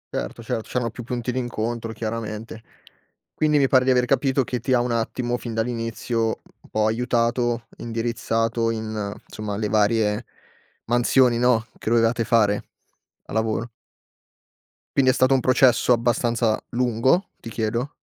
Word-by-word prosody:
Certo, 115 - -4
cer 115 - -2
c'eran 120 0 -2
più 120 - -8
punti 120 +1 -3
d'incontro 115 -2 -3
chiaramente. 110 0 -5 0.7
Quindi 150 -1 +2
mi 140 -2 +4
pare 130 -1 +4
di 130 - +1
aver 125 -1 +4
capito 135 +1 +2
che 125 +1 -3
ti 130 - -3
ha 125 - +4
un 120 0 -1
attimo, 120 +1 -1
fin 115 -2 -6
dall'inizio, 115 0 -1 0.4
un - - -20
po' 110 0 +1
aiutato, 120 +1 0
indirizzato 115 0 -1
in 110 -2 -3 0.2
insomma 105 -1 -5
le 105 0 -1
varie 105 +1 +2 0.6
mansioni 120 0 +3
no, 120 -2 +3
che - - -3
dovevate 115 0 +2
fare, 105 -3 +2 0.6
a - - -10
lavoro. 110 +1 -1 1.3
Quindi 135 -2 +5
è - - +5
stato 130 +1 +4
un 135 - +4
processo 130 -1 +4
abbastanza 115 -1 +1
lungo, 125 - +1
ti 115 - -8
chiedo? 115 +5 -2
115 Hz, 145 wpm, -23 LUFS, 110-125 Hz, 1.3 s, Quindi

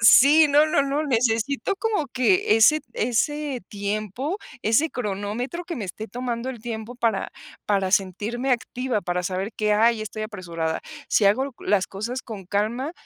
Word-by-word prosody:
sí, 285 +7 +8
no, 295 +2 +5
no, 295 -2 +2
no, 285 +3 -1
necesito 250 - +1
como 420 -9 -1
que 220 -4 +3
ese 300 +8 +6
ese 295 - -1
tiempo, 215 - -3 0.3
ese 225 +9 +3
cronómetro 220 - -3
que 340 -1 -5
me 210 -6 -4
esté 220 +4 -6
tomando 245 +2 -3
el 240 -4 -9
tiempo 230 0 -5
para 230 -5 0 0.4
para 195 -2 +1
sentirme 210 +7 0
activa, 250 -1 -1
para 180 -1 -2
saber 190 +3 -2
que, 210 -1 +1
hay 225 +1 +3
estoy 215 0 -6
apresurada. 170 -6 -3 0.3
Si 210 - +3
hago 260 +8 +3
las 195 -2 +1
cosas 235 +6 -4
con 210 -5 -8
calma, 225 - -1
230 Hz, 155 wpm, -24 LUFS, 205-265 Hz, 0.4 s, sí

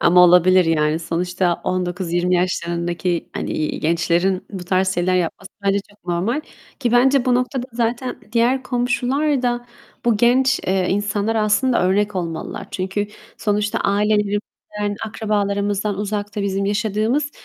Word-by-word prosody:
Ama 180 +1 +5
olabilir. 180 +1 +6
Yani, 155 -1 +1
sonuçta 175 +1 -1
19-20 180 -1 0
yaşlarındaki, 175 -1 -1
hani, 155 - -3
gençlerin 175 +3 +1
bu 190 -3 -6
tarz 190 +1 +1
şeyler 180 +1 +1
yapması 180 +2 -2 0.2
bence 200 0 +3
çok 205 -3 -25
normal. 190 - 0 0.4
Ki 240 -2 0
bence 260 +1 +4
bu 250 -1 +3
noktada 250 0 -1
zaten 240 +2 -2
diğer 245 +3 +2
komşular 255 +3 0
da 240 0 -1 0.4
bu 235 -3 +3
genç, 255 +4 +3
eee, 190 -1 +1
insanlara 205 +2 0
aslında 235 +2 +2
örnek 200 +2 +1
olmalılar. 165 -3 -4
Çünkü 190 +2 -2 0.3
sonuçta 210 0 0
ailelerimizden, 205 0 -1
akrabalarımızdan 205 -1 -1
uzakta 205 0 -3
bizim 195 0 -1
yaşadığımız 215 +8 0
205 Hz, 125 wpm, -20 LUFS, 180-235 Hz, 0.4 s, olabilir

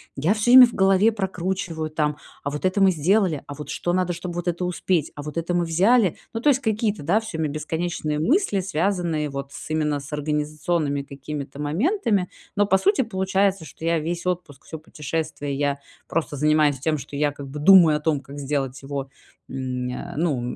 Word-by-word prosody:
я 155 +9 +2
всё 220 +2 +1
время 255 0 +11
в 235 - -10
голове 195 +3 +4
прокручиваю 185 -5 -3
там: 150 -1 -1 0.3
"А 140 - -1
вот 150 +5 -4
это 185 +2 +1
мы 195 - +6
сделали? 175 -1 +1
А 145 - -6
вот 150 - -8
что 175 - -2
надо, 180 -1 +1
чтобы 175 0 -6
вот 175 0 -4
это 175 +1 -1
успеть? 180 -2 0
А 145 - -6
вот 150 +1 -7
это 170 +1 -1
мы 175 -1 +1
взяли?". 190 +4 +3 0.2
Ну, 225 - -2
то 290 +6 +3
есть, 270 -1 +3
какие-то, 215 - -1
да, 180 +9 +3
всё 220 -7 -6
время 155 -2 -1
бесконечные 155 0 -2
мысли, 245 - +2
связанные 170 -4 -1
вот 140 0 -6
с - - -9
именно 150 -2 0
с 140 +2 -10
организационными 150 0 -1
какими-то 140 +1 -7
моментами. 200 - 0 0.3
Но 205 0 +3
по 190 - +4
сути 400 - +2
получается, 195 -4 0
что 160 - -13
я 165 -1 +2
весь 170 +3 -4
отпуск, 175 -6 -3
всё 160 - -7
путешествие, 150 -2 -4
я 140 0 0 0.3
просто 155 -3 -2
занимаюсь 150 -1 +3
тем, 155 +3 0
что 140 0 -8
я 145 0 +2
как 140 -1 -9
бы 150 +2 -6
думаю 165 -2 +7
о - - -6
том, 150 -2 0
как 140 +2 -10
сделать 135 -2 -2
его, 135 -1 -5 0.4
м, 130 -1 -3
э, 125 - -6
ну 150 -6 0
160 Hz, 200 wpm, -23 LUFS, 145-190 Hz, 0.4 s, время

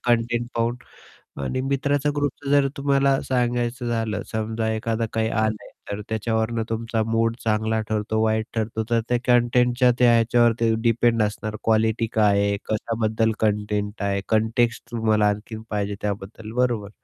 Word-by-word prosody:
Content 120 0 +1
पाहून 115 +1 0 0.7
आणि 100 - -2
मित्राचा 140 +2 0
ग्रुपचं 145 -1 -2
जर 140 -1 +4
तुम्हाला 140 -1 +2
सांगायचं 120 -1 -1
झालं. 115 -2 -1
समजा 110 0 -2
एखादं 115 +1 -1
काही 110 0 0
आलंय, 110 -1 -1 0.2
तर 100 +1 -4
त्याच्यावरून 110 +1 -1
तुमचा 115 0 -1
मूड 115 +1 +1
चांगला 110 0 +1
ठरतो, 110 0 0
वाईट 110 0 +1
ठरतो. 110 0 -1
तर 115 -1 +3
त्या 120 - +3
कंटेंटच्या 125 0 +3
त्या 125 -1 +6
ह्याच्यावरती 115 0 +3
डिपेंड 115 -1 +2
असणार. 105 +1 -3
क्वालिटी 110 +1 +2
काय 105 -2 +3
आहे, 100 0 0
कशाबद्दल 110 0 0
कंटेंट 105 -1 -1
आहे, 100 0 0
कंटेक्स्ट 115 +2 +1
तुम्हाला 110 -2 +2
आणखीन 105 +2 -5
पाहिजे 100 -1 -2
त्याबद्दल, 105 +2 -5
बरोबर? 120 -5 +1
115 Hz, 140 wpm, -23 LUFS, 110-120 Hz, 0.7 s, त्या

